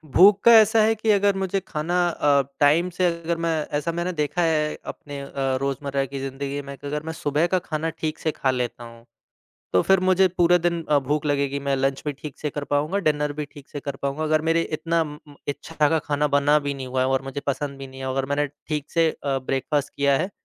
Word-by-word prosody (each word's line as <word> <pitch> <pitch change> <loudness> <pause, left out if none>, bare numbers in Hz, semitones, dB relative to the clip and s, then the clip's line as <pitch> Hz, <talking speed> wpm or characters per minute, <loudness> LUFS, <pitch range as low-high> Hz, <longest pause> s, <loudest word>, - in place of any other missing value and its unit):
भूख 200 +2 +7
का 235 - +8
ऐसा 220 +1 +4
है 225 +1 +3
कि 220 +1 -2
अगर 200 -1 +3
मुझे 195 0 -1
खाना 175 +3 0
अ, 145 -3 +3 0.2
टाइम 155 +5 +4
से 180 +1 0
अगर 170 0 -2
मैं 165 - +1 0.3
ऐसा 170 +3 -2
मैंने 170 +2 -2
देखा 150 +2 -1
है, 155 -2 +1
अपने 145 -1 -7
अ, 140 - -9 0.3
रोज़मर्रा 140 0 -1
की 135 +1 -6
ज़िंदगी 135 +1 -4
में 140 0 -8
कि 145 - -8
अगर 150 +1 -3
मैं 160 - -5
सुबह 150 +2 0
का 185 +1 +1
खाना 160 -1 -3
ठीक 155 0 -4
से 155 - 0
खा 130 -2 0
लेता 125 -1 -3
हूँ, 115 0 -13 0.7
तो 90 - +5
फिर 190 -1 +4
मुझे 185 0 +4
पूरे 175 0 +3
दिन 170 -1 0
अ, 145 -1 +4
भूख 150 +3 -1
लगेगी, 140 -1 0
मैं 140 -1 0
लंच 135 0 0
भी 145 - 0
ठीक 145 0 -9
से 150 - -3
कर 145 0 -4
पाऊँगा, 150 +8 0
डिनर 150 -4 0
भी 150 +1 -4
ठीक 145 0 -13
से 145 - -6
कर 140 -1 -5
पाऊँगा। 140 +3 -2
अगर 155 0 +2
मेरे 165 0 +3 0.2
इतना 165 +1 0
उम 150 -1 -7
उम, 145 - -14
इच्छा 150 +1 0
का 160 +1 +2
खाना 150 0 0
बना 145 +1 +4
भी 140 -1 -3
नहीं 135 -1 -6
हुआ 130 0 -1
है 130 - +2
और 135 0 +1
मुझे 135 +1 -5
पसंद 140 0 -2
भी 135 - -7
नहीं 130 0 -12
है 130 - -4
और 130 - -2
अगर 135 -1 0
मैंने 145 0 +1 0.2
ठीक 150 -2 -3
से 165 -1 +3
अ, 140 -3 -2
ब्रेकफ़ास्ट 135 +2 -2
किया 140 -1 +3
है, 190 - -2
150 Hz, 245 wpm, -24 LUFS, 140-170 Hz, 0.7 s, का